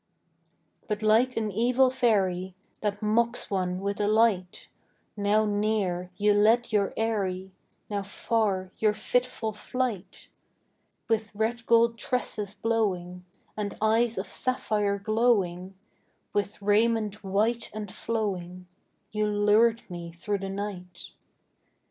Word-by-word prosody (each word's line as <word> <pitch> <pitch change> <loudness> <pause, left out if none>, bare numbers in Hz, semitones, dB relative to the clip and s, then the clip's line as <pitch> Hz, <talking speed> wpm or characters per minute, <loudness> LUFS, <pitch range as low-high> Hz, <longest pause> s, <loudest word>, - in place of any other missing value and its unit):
But 210 0 -2
like 230 +4 +3
an 215 -2 -1
evil 250 +5 +3
fairy, 190 -8 +1 0.3
That 210 0 -2
mocks 230 +2 +1
one 185 -2 -1
with 200 +1 -2
a 205 - +2
light, 210 -4 +2 0.5
Now 210 +1 +2
near, 205 -4 0
you 210 0 +3
led 225 +4 +3
your 200 -2 +2
airy, 190 -4 -1 0.4
Now 205 -1 -2
far, 195 -2 -1
your 215 -1 +2
fitful 235 0 -1
flight: 210 -4 -4 0.8
With 220 -2 -1
red 230 +2 -2
gold 230 0 +4
tresses 210 -4 -2
blowing, 185 -5 -1 0.3
And 205 -2 -4
eyes 225 +2 +2
of 190 - -2
sapphire 210 -3 0
glowing, 200 -4 +1 0.6
With 205 0 -1
raiment 210 0 +2
white 215 +5 0
and 210 -2 -6
flowing, 185 -6 -3 0.5
You 215 0 0
lured 210 +3 +3
me 170 -2 -7
through 200 +4 -2
the 195 0 -5
night. 190 -3 -6
210 Hz, 120 wpm, -27 LUFS, 195-225 Hz, 0.8 s, gold